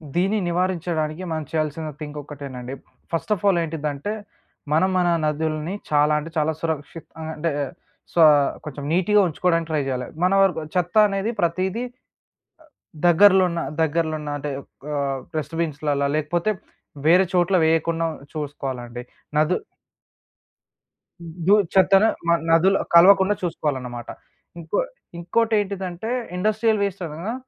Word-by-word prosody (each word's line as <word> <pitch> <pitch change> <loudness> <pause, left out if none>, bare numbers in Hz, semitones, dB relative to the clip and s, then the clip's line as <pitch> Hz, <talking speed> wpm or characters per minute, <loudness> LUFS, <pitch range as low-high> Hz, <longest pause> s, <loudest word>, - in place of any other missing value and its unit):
దీన్ని 195 +5 +2
నివారించడానికి 170 -2 -1
మనం 155 -1 -2
చేయాల్సిన 155 0 -2
థింక్ 150 -1 -7
ఒక్కటేనండి. 135 -3 -8 0.4
ఫస్ట్ 165 +6 0
ఆఫ్ 195 - -12
ఆల్ 180 -3 +4
ఏంటిదంటే, 155 +3 -3 0.6
మనం 175 +5 +3
మన 180 - +2 0.2
నదుల్ని 155 +3 -1 0.2
చాలా 150 +1 +4
అంటే 155 +2 -7
చాలా 155 +1 +2
సురక్షిత 160 0 -4 0.2
ఆహ్, 160 0 -5
అంటే 165 +2 -1 0.6
సో 170 - +3 0.4
కొంచెం 145 -1 -7
నీట్‌గా 190 +4 +3
ఉంచుకోవడానికి 165 0 0
ట్రై 155 -2 +1
జేయాలి. 125 -1 -2 0.2
మన 185 - +3
వరకు 175 -5 +2
చెత్త 180 +2 0
అనేది 200 +3 -1
ప్రతీదీ 185 +7 0
అ 245 - -27 1.1
దగ్గరలోన్న 180 -1 +5 0.2
దగ్గరలోన్న 155 -1 0
అంటే 145 +1 -4 0.4
ఆహ్, 140 -2 -1 0.2
డస్ట్‌బిన్స్‌ల్లలా 150 -2 -1
లేకపోతే 170 +6 0 0.6
వేరే 180 +4 +6
చోట్ల 180 +1 +3
వేయకుండా 165 +1 +1 0.3
చూసుకోవాలండి. 130 -5 -5 0.4
నదు 155 +4 +3 1.9
దుద్ 205 -3 +5
చెత్తను 195 +2 +6 0.2
మ 170 - +4 0.2
నదులో 185 +4 +4 0.2
కలవకుండా 190 +3 +7
చూసుకోవాలన్నమాట. 130 -8 -3 0.5
ఇంకో 160 -1 -2 0.4
ఇంకోటేంటిదంటే, 200 0 -1 0.3
ఇండస్ట్రియల్ 215 +2 +1
వేస్ట్ 200 -2 -3
అనగా 165 +9 -5
165 Hz, 115 wpm, -23 LUFS, 150-185 Hz, 1.9 s, కలవకుండా